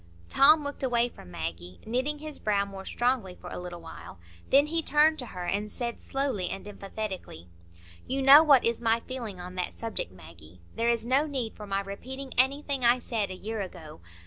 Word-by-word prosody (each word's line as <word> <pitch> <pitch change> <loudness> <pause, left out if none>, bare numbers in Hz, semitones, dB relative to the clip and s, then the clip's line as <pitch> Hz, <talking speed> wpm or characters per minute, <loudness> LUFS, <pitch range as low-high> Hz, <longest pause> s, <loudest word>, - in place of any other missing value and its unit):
Tom 300 +2 +6
looked 285 0 -4
away 245 -2 +2
from 90 - -14
Maggie, 85 +2 -6
knitting 260 +7 -1
his 305 0 -7
brow 200 -2 +1
more 195 -1 -9
strongly 240 -7 0
for 180 - -10
a - - -5
little 175 -1 -7
while. 90 - -10 0.3
Then 280 +2 +6
he 330 +2 0
turned 310 +1 +4
to 250 - -5
her 180 -4 -6
and 205 +4 -1
said, 235 +1 -4
slowly 270 -9 -1
and 195 - -6
emphatically,— 195 - -6 0.6
"You 270 +1 -1
know 275 +3 +10
what 285 -5 +6
is 230 0 +1
my 230 0 +2
feeling 230 -8 -6
on 180 +1 -7
that 180 - -3
subject, 225 - -4
Maggie. 85 -1 -15 0.2
There 230 +1 +1
is 230 -1 +1
no 270 +5 +2
need 260 -6 -3
for 210 - -9
my 195 0 0
repeating 260 +7 -7
anything 275 +1 +1
I 240 +1 +6
said 225 -4 -2
a 185 - -5
year 215 +3 -4
ago. 165 - -9
225 Hz, 200 wpm, -28 LUFS, 185-265 Hz, 0.6 s, know